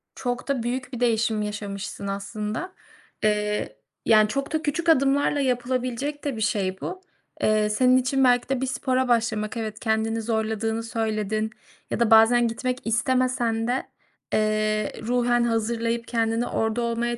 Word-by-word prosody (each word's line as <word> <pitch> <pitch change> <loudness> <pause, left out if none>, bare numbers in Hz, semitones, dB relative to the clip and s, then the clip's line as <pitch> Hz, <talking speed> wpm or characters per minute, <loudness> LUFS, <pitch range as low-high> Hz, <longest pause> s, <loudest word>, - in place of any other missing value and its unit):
Çok 245 +1 -3
da 270 -4 0
büyük 250 +2 -3
bir 245 - -4
değişim 225 -2 +1
yaşamışsın 200 -1 -5
aslında, 210 - -4 0.5
ııı, 210 0 +1 0.4
yani, 215 -1 +6
çok 275 +6 -3
da 315 - +1
küçük 335 +2 -1
adımlarla 285 -1 +3
yapılabilecek 255 +2 -1
de 280 -5 -2
bir 220 - -5
şey 190 -3 -1
bu. 370 +1 -5 0.4
Eee, 215 0 +3
senin 255 +4 +4
için 265 +1 +1
belki 245 0 +3
de 265 -1 0
bir - - +1
spora 260 0 0
başlamak; 230 -2 0
evet, 215 -2 -4
kendini 225 0 0
zorladığını 220 0 -1
söyledin 220 -1 -1 0.4
ya - - -1
da 230 -1 +2
bazen 230 +2 +6
gitmek 250 +2 -2
istemesen 235 -1 +1
de, 255 +2 0 0.5
eee, 215 -1 +1
ruhen 240 0 +2
hazırlayıp 230 0 -1
kendini 230 0 0
orada 225 +2 -1
olmaya 235 0 -1
230 Hz, 145 wpm, -25 LUFS, 215-250 Hz, 0.5 s, yani